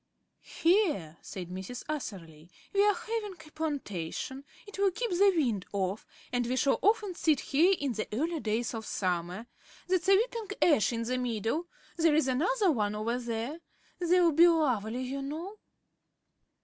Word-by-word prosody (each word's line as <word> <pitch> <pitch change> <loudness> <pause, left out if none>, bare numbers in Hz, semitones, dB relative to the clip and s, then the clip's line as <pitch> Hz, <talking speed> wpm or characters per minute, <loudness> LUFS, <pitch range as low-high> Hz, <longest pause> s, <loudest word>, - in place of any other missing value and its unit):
"Here," 325 - +2
said 180 -3 -7
Mrs. 190 +7 -6
Atherley, 170 - -6 0.2
"we 400 0 +4
are 415 -1 +4
having 435 0 -4
a 315 -3 -15
plantation. 270 - -4 0.2
It 410 -1 -10
will 400 -1 +4
keep 440 +4 -3
the 390 +3 +5
wind 235 - +1
off; 195 +1 -2 0.3
and 245 -1 +1
we 250 - 0
shall 275 +1 +2
often 420 -2 +2
sit 315 -5 +2
here 345 +8 +3
in 280 -3 -1
the 215 -1 -3
early 320 +9 -1
days 225 0 -1
of 225 -1 -4
summer. 180 +2 -2 0.4
That's 370 0 +1
a 390 - +8
weeping 450 -2 -2
ash 295 -11 +4
in 230 -1 -2
the 250 +2 -1
middle. 245 - -1 0.3
There's 320 -3 +3
another 365 - +2
one 210 -6 0
over 230 +3 -1
there. 235 +6 -4 0.4
They'll 350 -1 +4
be 330 +3 +7
lovely, 255 -8 +1
you 270 +2 -4
know." 330 +9 -6
280 Hz, 160 wpm, -30 LUFS, 220-355 Hz, 0.4 s, a